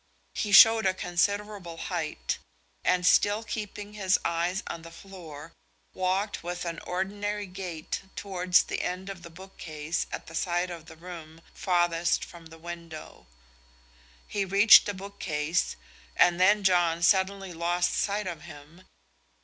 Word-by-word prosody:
He 210 - -2
showed 225 +1 +8
a 185 - +1
considerable 190 0 -2
height; - - -3 0.4
and 180 0 +2
still 205 +4 +4
keeping 210 -1 -6
his 195 -2 +2
eyes 170 +3 -1
on 170 - -6
the 165 - -11
floor, 165 -3 -11 0.4
walked 190 +3 -1
with 175 +1 -4
an 170 -1 -4
ordinary 205 +3 -3
gait 180 -4 -6
towards 185 -2 +2
the - - -4
end 185 +2 -4
of 185 -3 -10
the 170 - -10
bookcase 165 -3 -5
at - - -6
the 165 - -12
side 175 +2 -1
of 165 -2 -9
the 160 - -12
room 165 -1 -10
farthest 175 -2 +1
from 170 -2 -13
the 165 0 -14
window. 170 - -9 1.0
He 205 - -1
reached 200 +2 +7
the 205 - -3
bookcase, 180 -4 -2 0.4
and 175 0 +4
then 205 +2 +5
John 175 -3 +2
suddenly 190 +1 +2
lost 175 +1 0
sight 205 0 -1
of 170 -4 -5
him. 160 +3 -14
180 Hz, 140 wpm, -28 LUFS, 170-195 Hz, 1.0 s, showed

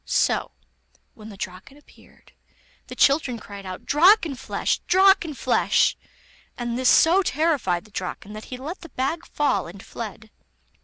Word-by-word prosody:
So, - - 0 0.6
when 215 0 -12
the 200 - -11
Draken 190 +10 -8
appeared, 295 - -22 0.6
the - - -9
children 275 -4 +2
cried 200 -3 -10
out: 185 0 -8
'Drakenflesh! 330 - +2
Drakenflesh!' 375 -5 +3 0.6
and 240 -1 -3
this 255 0 +2
so 345 +4 +5
terrified 285 - 0
the 215 - -19
Draken 195 +2 -6
that 215 +1 -9
he 255 - -7
let 305 +9 -7
the 335 - -11
bag 320 +7 -3
fall 245 - 0
and 190 +3 -12
fled. 220 -1 -8
255 Hz, 140 wpm, -23 LUFS, 210-320 Hz, 0.6 s, so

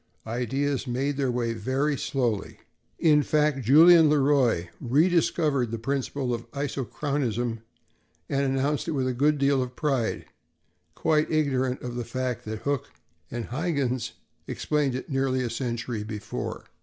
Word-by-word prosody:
Ideas 130 +4 -1
made 135 +4 -1
their 135 -2 +1
way 120 -1 -1
very 130 +7 0
slowly. 120 -7 -2 0.4
In 150 -2 +4
fact, 150 -2 +1
Julien 160 +6 +7
Le 150 - +4
Roy 130 -11 +2
rediscovered 150 -2 +2
the 115 - -3
principle 135 +1 -2
of 115 0 -5
isochronism 135 -4 -2 0.7
and 140 - 0
announced 140 +2 0
it 165 - -1
with 130 -3 0
a 130 - 0
good 145 +4 +2
deal 140 -1 +2
of 125 0 -5
pride, 135 -7 -1 0.7
quite 155 -1 +1
ignorant 130 -4 0
of 125 -1 -4
the 120 - -2
fact 125 0 -3
that 110 0 -5
Hooke 140 -2 -1 0.4
and 120 -1 -5
Huyghens 135 -3 -1 0.3
explained 145 -4 0
it 130 - -5
nearly 135 -1 +1
a 120 - -2
century 120 -2 -3
before. 105 -1 -5
135 Hz, 145 wpm, -26 LUFS, 120-145 Hz, 0.7 s, Julien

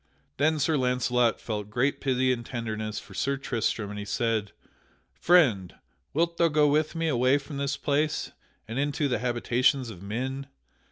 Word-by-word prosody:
Then 155 +3 +2
Sir 155 +1 +1
Launcelot 125 -2 +1
felt 105 -2 -4
great 125 +6 0
pity 130 -1 +2
and 120 -1 -5
tenderness 110 -3 -4
for 100 - -14
Sir 140 +8 -1
Tristram, 115 -5 -2
and 105 - -6
he 100 - -5
said: 110 -1 -1 0.6
"Friend, 125 - +3 0.4
wilt 170 +2 0
thou 170 - +4
go 150 -1 +3
with 155 +2 +1
me 165 0 0
away 130 -1 +3
from 145 0 -7
this 140 0 -1
place 150 +2 0 0.4
and 115 +4 -3
into 145 +1 0
the 125 -5 0
habitations 125 +1 +1
of 90 -4 -11
men? 130 +7 -4
130 Hz, 165 wpm, -27 LUFS, 115-145 Hz, 0.6 s, thou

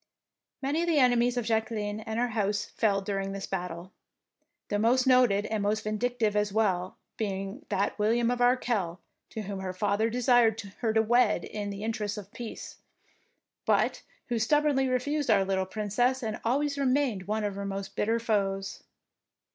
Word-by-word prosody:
Many 290 +5 0
of 345 - -1
the 330 -3 +2
enemies 245 -2 +3
of 240 - -1
Jacqueline 220 -2 -1
and 220 0 -5
her 245 +1 +1
house 210 -2 0
fell 200 -3 0
during 195 -1 -2
this 195 -1 -4
battle, 180 -1 -5 0.8
the 205 - 0
most 245 +4 +3
noted, 250 -6 +4
and 215 -2 -2
the - - +1
most 215 +1 0
vindictive 215 0 0
as 210 -1 +1
well, 190 -4 0 0.2
being 195 +3 -4
that 200 +1 -1
William 230 +3 +2
of 245 0 -2
Arkell 235 -8 +1 0.3
to 220 - -5
whom 200 -1 -5
her 185 -1 -4
father 205 +4 +1
desired 240 -2 +3
to 205 -3 -7 0.3
wed 240 +3 +3
her - - -8
in 205 -1 -4
the 200 +1 -6
interests 215 -2 -2
of 205 -1 -9
peace, 240 -2 -8 0.9
but - - +1 0.3
who 235 -1 0
stub 295 +7 +3
bornly 270 -3 +2
refused 285 +3 -1
our 200 -3 +4
little 190 -1 0
Princess 230 +6 0
and 220 -1 -3
always 280 +4 0
remained 255 -8 +1
one 215 +1 -1
of 205 -1 -1
her 200 +1 -5
most 195 0 -5
bitter 225 +2 +1
foes. 195 -3 -1
220 Hz, 175 wpm, -28 LUFS, 200-245 Hz, 0.9 s, noted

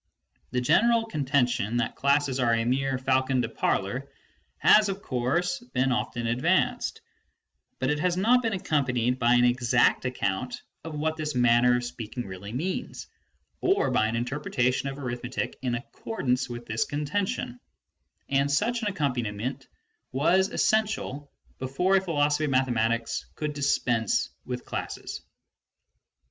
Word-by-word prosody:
The 125 - -1
general 230 - +4
contention 130 - 0
that 120 - -1
classes 140 -1 +2
are 120 -2 +3
a 115 0 0
mere 135 +2 +1
faron 130 0 +1
de - - -1
parler - - -1 0.5
has, 210 -1 +6
of 195 0 -4
course, 155 - 0
been 130 +1 +2
often 125 -1 -2
advanced, 130 +11 +1 0.8
but 130 +2 0
it 150 - 0
has 180 +2 +1
not 240 +6 +4
been 225 -3 -1
accompanied 130 - 0
by 120 +1 +4
an 120 - +4
exact 120 0 +3
account 125 -1 -2 0.2
of 160 -2 -6
what 155 +1 -1
this 150 -3 -3
manner 120 0 +4
of 125 - -3
speaking 120 0 -6
really 95 +2 -8
means, 165 +10 -3 0.5
or 390 +2 +2
by 110 - +3
an 110 - -2
interpretation 125 +1 0
of 135 - -7
arithmetic 125 -2 -4
in 125 -2 -1
ac 120 +3 -5
cordance 130 - -2
with 120 0 -7
this 110 0 0
contention; 145 -4 -2 0.7
and 140 +1 +2
such 230 +11 +1
an 215 - -1
accompaniment 125 - -2 0.4
was 180 +8 +3
essential 210 -10 0 0.3
before 160 +9 +2
a - - +2
philosophy 150 -4 +1
of - - -1
mathematics 115 -3 0
could 150 -1 -3
dispense 120 -6 +1
with 125 -1 -5
classes. - - -5
130 Hz, 140 wpm, -27 LUFS, 120-155 Hz, 0.8 s, has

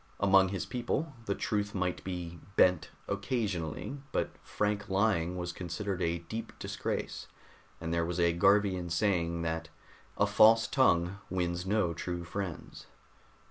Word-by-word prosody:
Among 95 -1 +5
his 95 -2 -3
people, 135 +5 -2
the 100 - +1
truth 105 -1 -1
might 90 -1 -1
be 90 -2 -5 0.2
bent 90 -3 +4 0.2
occasionally, 100 - -2
but - - 0
frank 105 +1 -1
lying 95 -3 +1
was 90 0 -3
considered 90 +2 -4
a 85 0 +1
deep 110 +7 -6
disgrace, - - -4 0.5
and 80 0 -3
there 85 0 +2
was 85 +1 -2
a 85 -1 +4
Garvian 95 0 +3
saying 85 -2 +1
that 80 0 -2 0.5
"a - - +4
false 115 +1 +6
tongue 95 -7 +2
wins 90 0 -1
no 100 -4 +2
true 85 +1 -4
friends." 90 -1 -6
90 Hz, 140 wpm, -31 LUFS, 85-105 Hz, 0.5 s, false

